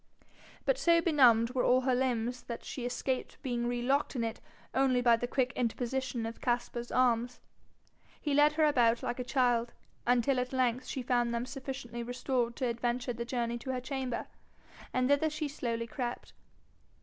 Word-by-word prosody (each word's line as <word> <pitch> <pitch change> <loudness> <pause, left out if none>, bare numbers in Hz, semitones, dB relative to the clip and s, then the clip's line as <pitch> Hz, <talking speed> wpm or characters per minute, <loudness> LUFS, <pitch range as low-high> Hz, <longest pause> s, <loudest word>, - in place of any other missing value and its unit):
But - - +2
so 335 -1 +5
benumbed 250 -8 +5
were 255 -1 0
all 255 +1 +4
her 260 0 +1
limbs 245 -1 0
that 235 -1 -7
she 245 -2 -4
escaped 255 +1 -3
being 240 -2 -1
relocked 245 +4 0
in 240 - 0
it 225 0 -4 0.3
only 260 -1 +3
by 240 -1 +5
the 245 +1 -3
quick 255 0 0
interposition 245 0 -2
of 225 0 -6
Caspar's 240 -1 -2
arms. 245 -1 +2 0.8
He 295 - -1
led 295 +1 +5
her 310 0 +3
about 240 -5 +3
like 245 +1 -3
a - - -1
child, 245 -2 +1 0.3
until 250 +2 +3
at 250 +1 -3
length 255 -1 +1
she 260 - -4
found 240 -1 +1
them 235 +1 -1
sufficiently 260 -3 -6
restored 245 0 -1
to 260 - -2
adventure 240 +1 -1
the 235 0 -4
journey 235 -1 -2
to 260 - -8
her 255 - -1
chamber, 260 -1 -3 0.7
and 255 0 +1
thither 285 +3 +3
she 305 0 -3
slowly 235 -5 -3
crept. 240 +1 -5
250 Hz, 175 wpm, -31 LUFS, 235-265 Hz, 0.8 s, so